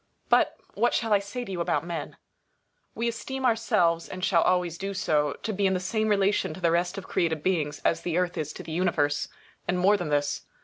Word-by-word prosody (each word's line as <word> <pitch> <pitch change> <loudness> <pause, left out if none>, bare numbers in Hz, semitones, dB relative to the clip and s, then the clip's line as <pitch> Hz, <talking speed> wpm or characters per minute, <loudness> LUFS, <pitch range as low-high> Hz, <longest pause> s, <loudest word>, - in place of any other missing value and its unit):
But - - +4 0.2
what 235 +3 +2
shall 225 -2 +1
I 205 - +5
say 220 +5 -5
to 195 - -7
you 180 -2 -2
about 170 - 0
men? 170 -3 -5 0.8
We 235 - -1
esteem 265 +3 -3
ourselves 210 -8 +2
(and 185 0 -3
shall 170 -4 +4
always 175 -2 +1
do 195 0 -4
so) 150 -5 +1
to 220 - -2
be 200 0 +2
in 190 - +1
the - - 0
same 215 +4 -1
relation 200 -5 +2
to - - -9
the 170 -2 +2
rest 175 +2 0
of 195 - -7
created 160 -3 0
beings 155 -6 0
as 165 - +2
the 170 -1 -1
Earth 180 -1 0
is 155 -3 -3
to - - -8
the - - -8
Universe. 155 -4 +1 0.4
And 180 - +1
more 195 +3 +4
than 175 -5 -4
this. 145 -1 0
180 Hz, 225 wpm, -27 LUFS, 165-205 Hz, 0.8 s, I